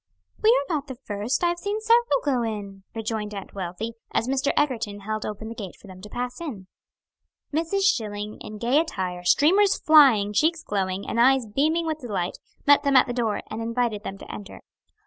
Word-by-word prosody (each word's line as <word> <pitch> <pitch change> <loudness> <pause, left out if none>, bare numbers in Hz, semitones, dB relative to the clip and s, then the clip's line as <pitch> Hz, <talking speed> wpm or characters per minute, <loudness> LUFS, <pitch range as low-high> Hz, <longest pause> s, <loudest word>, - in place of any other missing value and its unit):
"We 435 - +5
are - - +4
not 295 -2 -2
the 260 - -6
first, 220 - -3
I 345 - +4
have 345 0 -2
seen 405 +3 -2
several 470 +2 +3
go 265 -4 +2
in," 205 -4 -5
rejoined 215 -2 -3
Aunt 195 - -8
Wealthy, 195 +4 -5 0.2
as 225 - 0
Mr. 270 +1 +1
Egerton 230 -8 0
held 215 +1 -3
open 215 +1 -6
the 225 - -6
gate 200 -6 -7
for - - -17
them 185 -1 -12
to 210 - -10
pass 245 +6 -4
in. 235 - -6 0.9
Mrs. 330 +6 0
Schilling 210 - 0
in 215 - -8
gay 240 +7 +2
attire, 185 - -3
streamers 370 - +4
flying, 260 -10 +6
cheeks 320 +8 +2
glowing, 190 -1 -2
and 235 - +1
eyes 265 0 +5
beaming 310 +10 +1
with 315 -1 -2
delight, 205 -9 -3 0.3
met 285 0 +6
them 280 -1 +1
at 260 - +7
the 245 - -4
door, 230 -4 -1
and 220 +1 -4
invited 230 -2 -1
them 195 - -6
to - - -10
enter. 205 -1 -9
230 Hz, 200 wpm, -25 LUFS, 205-295 Hz, 0.9 s, at